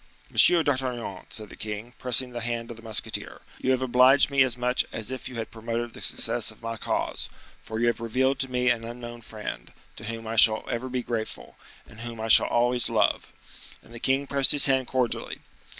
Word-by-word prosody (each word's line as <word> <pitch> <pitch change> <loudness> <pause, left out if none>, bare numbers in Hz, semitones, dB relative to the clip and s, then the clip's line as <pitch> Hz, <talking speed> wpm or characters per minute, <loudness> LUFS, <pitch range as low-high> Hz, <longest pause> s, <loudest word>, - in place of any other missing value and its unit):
"Monsieur 170 -2 +5
d'Artagnan," 130 -8 -3
said 110 -2 -6
the - - -11
king, 105 +3 -6
pressing 125 0 +1
the 120 -1 -5
hand 115 0 -2
of 115 - -9
the - - -12
musketeer, 110 -2 -3 0.2
"you - - -2
have 130 0 +2
obliged 130 +3 +5
me 140 -1 +3
as 125 -2 +2
much 125 +1 +1
as 110 +2 -4
if 130 - -6
you 125 - -10
had 115 -1 -5
promoted 115 +1 -4
the - - -10
success - - +2
of - - -9
my 115 0 -4
cause, - - -2 0.3
for 110 0 -6
you 120 - +2
have 120 0 +1
revealed 130 +4 0
to 135 - -2
me 125 0 +2
an 115 -1 -2
unknown 120 0 -8
friend, 105 - -7 0.3
to - - -8
whom 115 +1 -5
I 110 +1 -4
shall 110 0 +6
ever 125 +2 -3
be 125 -1 -3
grateful, 110 - -5 0.3
and 110 - -14
whom 115 -1 -6
I 110 +1 -4
shall - - +8
always 120 +1 +2
love." - - +1 0.5
And 115 - -17
the 120 - -8
king 135 +3 +1
pressed 140 0 +5
his 145 - +6
hand 130 -2 +2
cordially. 125 -3 -2
120 Hz, 215 wpm, -26 LUFS, 115-130 Hz, 0.5 s, shall